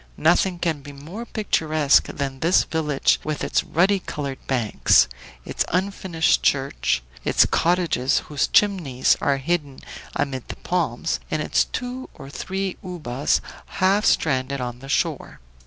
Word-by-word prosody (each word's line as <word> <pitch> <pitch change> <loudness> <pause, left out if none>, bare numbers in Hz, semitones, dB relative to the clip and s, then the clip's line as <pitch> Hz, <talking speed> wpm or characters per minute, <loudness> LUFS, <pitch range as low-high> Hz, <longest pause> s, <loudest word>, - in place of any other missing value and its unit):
Nothing 175 +3 +3
can 165 -4 -1
be 145 +1 -10
more 170 +12 -8
picturesque 155 - +2
than 135 -2 -4
this 170 +5 +4
village 150 -4 +1
with 155 -1 -3
its - - +1
ruddy 190 +4 +2
colored 140 -6 -5
banks, 120 -5 +3 0.4
its - - -1
unfinished 180 -3 +1
church, 135 - 0 0.2
its - - +4
cottages, 170 -7 +1
whose 145 -2 0
chimneys 175 -12 +3
are 140 -1 +2
hidden 145 -1 -2 0.4
amid 130 -3 -2
the - - -6
palms, 165 -4 -1
and 155 - -1
its 155 - +1
two 250 +1 -5
or 135 -3 -11
three 190 +3 -4
ubas 150 -8 -1 0.4
half 195 +3 +3
stranded 140 -7 +1
on 125 -1 -5
the 135 +1 -11
shore. - - -1
155 Hz, 140 wpm, -23 LUFS, 135-180 Hz, 0.4 s, this